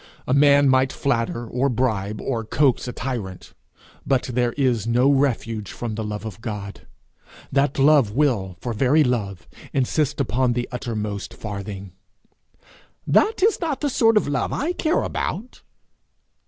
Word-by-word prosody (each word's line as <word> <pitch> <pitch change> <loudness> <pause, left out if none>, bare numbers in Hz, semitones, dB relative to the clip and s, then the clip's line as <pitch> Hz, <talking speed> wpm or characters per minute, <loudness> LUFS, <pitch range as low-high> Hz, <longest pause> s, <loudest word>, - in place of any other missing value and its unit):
A 130 - +1
man 140 0 +5
might 130 0 +3
flatter, 120 -3 -1
or 125 +4 0
bribe, 110 -5 -1
or 115 -4 -2
coax 130 +2 +1
a - - -3
tyrant; 115 -8 -5 0.5
but 135 -2 +1
there 120 -1 +1
is 125 -6 0
no 125 +4 +3
refuge 115 -6 0
from 120 -2 -5
the 110 +1 -4
love 105 +1 -5
of 110 -1 -8
God; 105 -3 -7 0.6
that 140 0 +1
love 140 -4 +5
will, 105 -8 0
for 120 - -3
very 135 +8 +3
love, 105 -8 -2 0.3
insist 140 +2 0
upon 125 -1 +1
the 120 0 -2
uttermost 105 -4 -4
farthing. 100 -2 -7 1.1
'That 425 -3 +2
is 430 -1 +3
not 315 -5 -2
the 290 -2 0
sort 225 -4 +4
of 210 - +2
love 145 0 -1
I 310 +6 -1
care 320 -1 0
about!' 240 +5 -4
125 Hz, 150 wpm, -22 LUFS, 110-140 Hz, 1.1 s, man